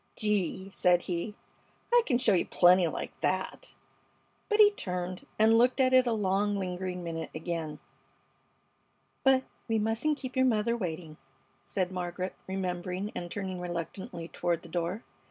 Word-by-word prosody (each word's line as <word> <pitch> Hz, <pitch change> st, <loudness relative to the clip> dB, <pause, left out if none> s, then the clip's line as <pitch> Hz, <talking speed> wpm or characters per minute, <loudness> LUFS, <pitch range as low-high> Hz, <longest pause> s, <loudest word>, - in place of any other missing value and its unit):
"Gee!" 195 Hz, -2 st, -1 dB
said 180 Hz, -2 st, +3 dB
he, 180 Hz, +4 st, -3 dB, 0.6 s
"I 485 Hz, -, +8 dB
c'n 245 Hz, -, +3 dB
show 240 Hz, -4 st, +3 dB
you 180 Hz, -, +2 dB
plenty 180 Hz, 0 st, +5 dB
like 155 Hz, -, -4 dB
that!" 185 Hz, 0 st, -2 dB, 0.7 s
But 425 Hz, 0 st, +2 dB
he 415 Hz, -1 st, +9 dB
turned 180 Hz, -, -4 dB
and 220 Hz, +1 st, +5 dB
looked 245 Hz, +3 st, +4 dB
at 260 Hz, -1 st, +4 dB
it 255 Hz, -1 st, +6 dB
a -, -, +2 dB
long, 205 Hz, -1 st, +1 dB
lingering 180 Hz, -1 st, -3 dB
minute 165 Hz, -1 st, -4 dB
again. 160 Hz, -2 st, -3 dB, 1.5 s
"But 265 Hz, -1 st, +5 dB, 0.2 s
we 225 Hz, -1 st, +1 dB
mustn't 225 Hz, +8 st, 0 dB
keep 260 Hz, -3 st, -6 dB
your 260 Hz, 0 st, +4 dB
mother 235 Hz, 0 st, +2 dB
waiting," 165 Hz, -6 st, -5 dB, 0.5 s
said 185 Hz, -2 st, -2 dB
Margaret, 180 Hz, 0 st, -3 dB
remembering 185 Hz, +1 st, -3 dB
and 175 Hz, -, -5 dB
turning 190 Hz, -1 st, -4 dB
reluctantly 175 Hz, 0 st, -5 dB
toward 170 Hz, -1 st, -1 dB
the 170 Hz, -, -11 dB
door. 175 Hz, +6 st, -2 dB
185 Hz, 150 wpm, -30 LUFS, 175-225 Hz, 1.5 s, he